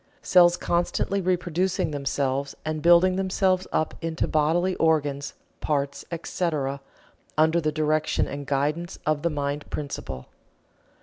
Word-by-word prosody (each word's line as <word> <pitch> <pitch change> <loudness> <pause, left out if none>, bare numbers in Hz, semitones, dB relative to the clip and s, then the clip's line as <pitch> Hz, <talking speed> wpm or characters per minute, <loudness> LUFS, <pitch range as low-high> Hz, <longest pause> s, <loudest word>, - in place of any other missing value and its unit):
Cells 175 -1 +5
constantly 175 +3 0
reproducing 180 -1 0
themselves 140 -1 -2
and 155 0 -2
building 175 +2 +5
themselves 185 -1 +1
up 155 - 0
into 165 0 -1
bodily 165 +4 +2
organs, 145 -3 +1 0.2
parts, 140 -2 -1
etc., 155 -5 -2 0.6
under 160 +2 +4
the 155 -1 0
direction 155 0 0
and 140 0 -6
guidance 150 +5 -1
of 155 -1 +1
the 170 - +1
mind 145 -1 -3
principle. 100 - -5
155 Hz, 120 wpm, -25 LUFS, 145-175 Hz, 0.6 s, Cells